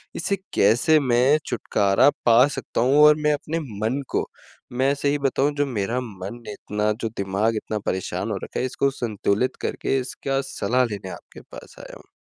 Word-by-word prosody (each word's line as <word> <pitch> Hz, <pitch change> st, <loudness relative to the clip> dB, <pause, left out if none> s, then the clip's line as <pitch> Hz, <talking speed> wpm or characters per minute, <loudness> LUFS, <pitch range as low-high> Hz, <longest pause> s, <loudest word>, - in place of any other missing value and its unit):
इसे 195 Hz, +4 st, -1 dB, 0.2 s
कैसे 120 Hz, +10 st, +4 dB
मैं 130 Hz, +2 st, +3 dB
छुटकारा 100 Hz, +6 st, +2 dB, 0.2 s
पा 120 Hz, +2 st, +6 dB
सकता 135 Hz, -4 st, -3 dB
हूँ? 130 Hz, +4 st, +3 dB
और 150 Hz, -, +7 dB
मैं 150 Hz, -, +3 dB
अपने 155 Hz, +3 st, -3 dB
मन 115 Hz, +1 st, -3 dB
को, -, -, -1 dB, 0.5 s
मैं 135 Hz, +3 st, +2 dB
सही 145 Hz, +1 st, 0 dB
बताऊँ 140 Hz, +2 st, 0 dB
जो 145 Hz, -, +1 dB
मेरा 115 Hz, +1 st, -2 dB
मन 105 Hz, +1 st, -8 dB
इतना 105 Hz, +1 st, -2 dB
जो 115 Hz, -, -1 dB
दिमाग 100 Hz, +4 st, 0 dB
इतना 110 Hz, 0 st, -3 dB
परेशान 95 Hz, -1 st, -2 dB
हो -, -, -2 dB
रखा -, -, -5 dB
है -, -, 0 dB
इसको 135 Hz, +2 st, 0 dB
संतुलित 110 Hz, +1 st, 0 dB
करके 135 Hz, -, -1 dB
इसका 135 Hz, +1 st, -3 dB
सलाह 125 Hz, +1 st, +1 dB
लेने 100 Hz, -2 st, -6 dB
आपके -, -, -11 dB
पास -, -, -13 dB
आया -, -, -10 dB
हूँ। -, -, -20 dB
125 Hz, 175 wpm, -23 LUFS, 105-140 Hz, 0.5 s, और